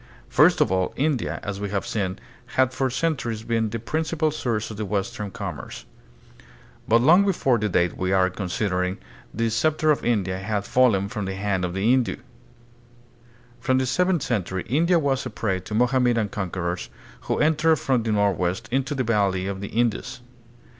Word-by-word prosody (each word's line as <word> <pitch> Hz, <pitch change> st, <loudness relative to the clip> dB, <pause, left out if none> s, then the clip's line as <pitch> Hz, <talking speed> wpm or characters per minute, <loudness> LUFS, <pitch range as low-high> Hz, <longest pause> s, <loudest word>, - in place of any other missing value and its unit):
First -, -, +4 dB
of -, -, +3 dB
all, 95 Hz, -1 st, 0 dB
India, 140 Hz, -4 st, 0 dB
as 100 Hz, -1 st, -4 dB
we 100 Hz, -, -3 dB
have 100 Hz, -1 st, -2 dB
seen, 95 Hz, -4 st, -2 dB, 0.4 s
had 130 Hz, 0 st, +3 dB
for 130 Hz, 0 st, 0 dB
centuries 120 Hz, -6 st, -2 dB
been 115 Hz, -1 st, 0 dB
the 115 Hz, -, -3 dB
prin 150 Hz, +8 st, -2 dB
cipal 160 Hz, -1 st, -1 dB
source 115 Hz, -6 st, -2 dB
of 110 Hz, -, -8 dB
the 110 Hz, -, -3 dB
western 100 Hz, 0 st, -3 dB
commerce. 90 Hz, -, -7 dB, 1.0 s
But 115 Hz, +1 st, +4 dB
long 170 Hz, +9 st, +6 dB
before 135 Hz, -, +2 dB
the 105 Hz, 0 st, 0 dB
date 90 Hz, -1 st, +1 dB
we 95 Hz, 0 st, -1 dB
are 95 Hz, -1 st, +3 dB
considering, 90 Hz, -1 st, -2 dB, 0.3 s
the 115 Hz, +1 st, -1 dB
scepter 155 Hz, +6 st, +2 dB
of 150 Hz, -, 0 dB
India 95 Hz, -6 st, 0 dB
had 100 Hz, +1 st, -2 dB
fallen 110 Hz, -7 st, +3 dB
from 105 Hz, 0 st, -4 dB
the 95 Hz, 0 st, -4 dB
hand 95 Hz, -1 st, -1 dB
of 90 Hz, 0 st, -2 dB
the 95 Hz, +3 st, 0 dB
Hindu. 125 Hz, 0 st, +3 dB, 1.4 s
From 130 Hz, +2 st, +1 dB
the 130 Hz, -, +1 dB
seventh 175 Hz, +4 st, +1 dB
century, 95 Hz, -5 st, -2 dB
India 170 Hz, +6 st, +3 dB
was 140 Hz, -4 st, 0 dB
a -, -, -5 dB
prey 95 Hz, -4 st, -2 dB
to 100 Hz, +4 st, -6 dB
Mohammedan 120 Hz, -2 st, +2 dB
conquerors, 90 Hz, -7 st, -3 dB, 0.4 s
who -, -, 0 dB
entered 160 Hz, +1 st, +3 dB
from 130 Hz, -4 st, 0 dB
the 110 Hz, -1 st, -2 dB
northwest 100 Hz, 0 st, 0 dB
into 135 Hz, +2 st, 0 dB
the 130 Hz, -, 0 dB
valley 100 Hz, -5 st, +1 dB
of 100 Hz, 0 st, -4 dB
the 100 Hz, -, -4 dB
Indus. 120 Hz, +3 st, -1 dB
110 Hz, 180 wpm, -24 LUFS, 95-130 Hz, 1.4 s, long